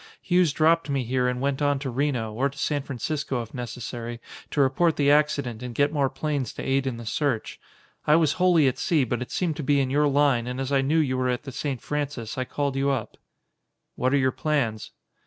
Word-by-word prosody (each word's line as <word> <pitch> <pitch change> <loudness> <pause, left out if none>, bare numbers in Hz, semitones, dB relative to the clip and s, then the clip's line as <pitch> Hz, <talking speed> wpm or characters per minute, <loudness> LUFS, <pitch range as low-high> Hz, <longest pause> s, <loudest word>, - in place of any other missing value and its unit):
Hughes 180 -3 +2
dropped 165 +1 +2
me 140 -2 0
here 125 +1 0
and 125 0 -1
went 140 +1 -1
on 145 -1 +2
to 135 -1 -4
Reno, 125 -4 -1
or 135 +5 +1
to 140 - -15
San 145 0 0
Francisco 135 0 -3
if 110 - -14
necessary, 120 -1 -6 0.3
to - - -3
report 140 +5 +3
the 145 -1 +3
accident 140 -6 +1
and 125 -2 -6
get 145 +3 +2
more 140 -3 +2
planes 145 -4 -2
to - - -6
aid 135 0 +1
in 125 -3 -2
the 120 - -8
search. 125 -1 -2 0.5
I 150 - +6
was 160 -3 +3
wholly 175 -6 +5
at 130 - -1
sea, 155 -5 +2
but 120 0 -2
it 125 - -5
seemed 165 -5 -1
to 155 - -4
be 145 +1 +3
in 130 -1 0
your 150 +1 +3
line 140 -4 +2
and 125 +1 -4
as 135 +1 -3
I 135 -1 +3
knew 155 +4 +2
that - - +2
you 130 -1 -1
were 130 0 +1
at 125 +2 -1
the 135 - -7
St. 130 -1 -4
Francis, 145 -6 -3
I 130 - -2
called 140 +1 -2
you 135 +1 +1
up." 130 -6 -2 0.8
"What 130 +1 0
are 140 - +3
your 130 -1 +2
plans?" 130 -9 -1
135 Hz, 235 wpm, -25 LUFS, 125-145 Hz, 0.8 s, I